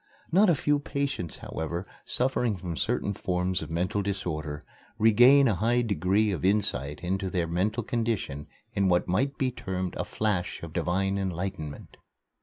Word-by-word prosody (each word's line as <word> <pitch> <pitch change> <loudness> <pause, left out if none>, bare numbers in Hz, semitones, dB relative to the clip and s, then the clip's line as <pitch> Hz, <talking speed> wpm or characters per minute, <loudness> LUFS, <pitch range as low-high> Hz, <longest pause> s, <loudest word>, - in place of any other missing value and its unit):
Not 195 +4 +5
a 170 - +5
few 145 +1 +1
patients, 140 - -3
however, 85 +3 -4 0.2
suffering 125 -4 +1
from 85 -1 -5
certain 100 - 0
forms 90 -1 -1
of - - -6
mental 90 +5 0
disorder, 80 -7 -3 0.3
regain 125 +6 +6
a 115 - +3
high 120 +6 +2
degree 100 +1 +2
of 95 - -3
insight 85 -8 +1
into 95 +2 -1
their 90 -2 0
mental 100 +8 0
condition 110 - -2 0.3
in 100 -1 +2
what 90 -1 +2
might 135 +10 0
be 130 -2 +1
termed 95 -5 -4
a - - -1
flash 95 -6 -2
of 80 -1 -7
divine 95 +3 0
enlightenment. 90 -5 -4
95 Hz, 155 wpm, -28 LUFS, 90-115 Hz, 0.3 s, regain